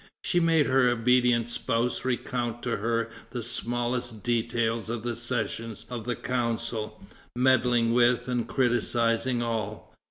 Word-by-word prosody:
She 175 - +2
made 165 -3 +4
her 130 -1 +4
obedient 120 0 +3
spouse 120 0 -1
recount 120 -2 -2
to 120 - -1
her 115 +2 -1 0.2
the 120 -2 -4
smallest 120 -1 -2
details 115 -1 0
of 115 -1 -3
the 120 -1 -2
sessions 115 -1 -3
of 120 -3 -5
the 120 -1 -1
Council, 115 -3 -2 0.4
meddling 125 -2 +3
with 120 0 +3
and 125 -2 -1
criticising 120 -1 +1
all. 110 -3 -4
120 Hz, 130 wpm, -27 LUFS, 115-125 Hz, 0.4 s, made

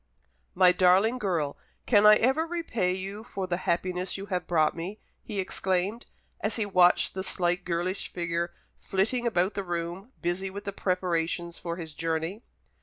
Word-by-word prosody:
"My 180 -1 +7
darling 190 +7 +4
girl, 170 -9 -1 0.3
can 210 -3 +6
I 210 - +10
ever 265 +9 +2
repay 280 - -1
you 195 +3 -4
for 195 -5 -4
the 175 -1 -1
happiness 180 +2 -1
you 195 - -6
have 180 -1 -1
brought 155 -3 +2
me!" 175 +5 -5 0.2
he 210 -3 -5
exclaimed, 190 +4 -1 0.3
as 215 - -1
he 220 - 0
watched 180 -3 +4
the 190 - -3
slight 180 -1 0
girlish 175 +2 -2
figure 170 0 -2 0.3
flitting 225 +6 0
about 190 -3 +1
the 200 - -3
room, 175 +5 -4
busy 180 +2 -2
with 200 +1 -7
the 200 -1 -4
preparations 175 -2 -1
for 170 -1 -4
his 165 -3 -7
journey. 165 +6 -2
185 Hz, 165 wpm, -28 LUFS, 175-205 Hz, 0.3 s, I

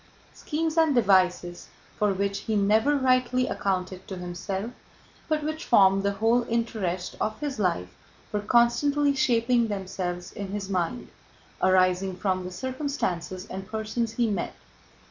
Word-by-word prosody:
Schemes 320 +1 -2
and 315 -4 +4
devices 185 -5 +2 0.3
for 210 -1 +2
which 200 +1 -1
he 220 - -2
never 220 +8 +3
rightly 255 -1 +2
accounted 185 -1 -2
to 190 - -6
himself, 190 +5 -4 0.6
but 310 -1 0
which 310 +1 -3
formed 195 -3 +5
the 200 0 0
whole 225 +4 +2
interest 215 -6 -2
of 215 0 -1
his 290 -5 -4
life, 90 - -1 0.4
were 210 - 0
constantly 265 +7 +3
shaping 240 -4 +2
themselves 185 -3 -4
in 200 - -6
his 200 0 -5
mind, 185 +6 -2 0.5
arising 185 0 +3
from 185 -1 -1
the 180 - -6
circumstances 230 - -3
and 190 -1 -7
persons 220 +1 -2
he 235 0 +1
met. 200 -5 -2
205 Hz, 140 wpm, -26 LUFS, 185-245 Hz, 0.6 s, formed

